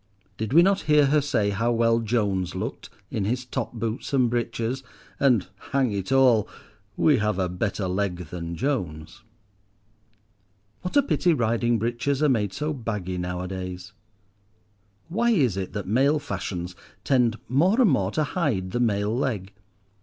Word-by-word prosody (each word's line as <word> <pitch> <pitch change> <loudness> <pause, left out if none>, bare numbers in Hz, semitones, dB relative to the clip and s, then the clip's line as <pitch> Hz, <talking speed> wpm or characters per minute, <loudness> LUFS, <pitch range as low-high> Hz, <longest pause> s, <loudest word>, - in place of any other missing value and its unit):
Did 110 -1 -4
we 170 +5 +7
not 195 +1 +3
hear 150 -1 +6
her 145 +2 +3
say 115 -8 0
how 115 +4 0
well 115 0 +3
Jones 105 -5 -1
looked - - -5 0.2
in 105 - -1
his 125 +4 -1
top 125 - -4
boots 115 +3 -4
and 125 -4 +3
breeches, 120 +1 -2 0.4
and, 125 -9 +3 0.3
"hang 135 -4 +2
it 100 +3 -3
all," 125 -5 +4 0.5
we 150 -5 +4
have 105 -3 0
a 95 -2 +1
better 95 +2 -2
leg 95 0 -1 0.2
than 85 -1 -5
Jones. 90 - -3 1.6
What 180 +9 -1
a 285 - +6
pity 180 -9 +2
riding 115 -2 +1
breeches 120 +6 -1
are 150 - +4
made 105 -6 +1
so 150 +9 -2
baggy 105 -8 -4
nowadays. 90 +1 -5 1.1
Why 225 +8 +1
is 140 - +3
it 95 -1 -4
that 100 -2 -4
male 135 +8 +3
fashions 95 -9 -5 0.3
tend 120 -4 +2
more 175 - +3
and 230 -9 +5
more 100 -8 +1
to 155 +9 0
hide 140 - -1
the 120 - -1
male 105 -2 +1
leg? 105 -7 -2
115 Hz, 155 wpm, -25 LUFS, 95-135 Hz, 1.6 s, we